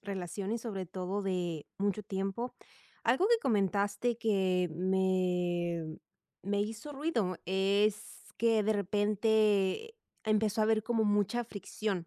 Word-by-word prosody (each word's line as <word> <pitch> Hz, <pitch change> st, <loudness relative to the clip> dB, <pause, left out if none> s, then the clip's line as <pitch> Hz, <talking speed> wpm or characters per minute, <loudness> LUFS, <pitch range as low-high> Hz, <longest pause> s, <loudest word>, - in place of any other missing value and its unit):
relación 195 Hz, 0 st, -4 dB
y 230 Hz, -, -1 dB
sobre 205 Hz, -5 st, -5 dB
todo 185 Hz, +3 st, -3 dB
de 175 Hz, -5 st, -2 dB
mucho 205 Hz, +1 st, -1 dB
tiempo. 195 Hz, +4 st, -3 dB, 0.5 s
Algo 255 Hz, -, +3 dB
que 475 Hz, -, +6 dB
comentaste 205 Hz, +1 st, +1 dB
que 190 Hz, -5 st, +1 dB
me 180 Hz, -2 st, +1 dB, 0.6 s
me 200 Hz, +2 st, 0 dB
hizo 225 Hz, +7 st, -6 dB
ruido 255 Hz, -, -1 dB
es 200 Hz, +3 st, 0 dB
que 225 Hz, -2 st, +3 dB
de 220 Hz, -, +2 dB
repente 210 Hz, -, +2 dB, 0.3 s
empezó 215 Hz, 0 st, +2 dB
a -, -, +4 dB
haber 220 Hz, 0 st, +2 dB
como 225 Hz, 0 st, +1 dB
mucha 210 Hz, +3 st, +1 dB
fricción 200 Hz, -3 st, -4 dB
205 Hz, 125 wpm, -32 LUFS, 185-220 Hz, 0.6 s, que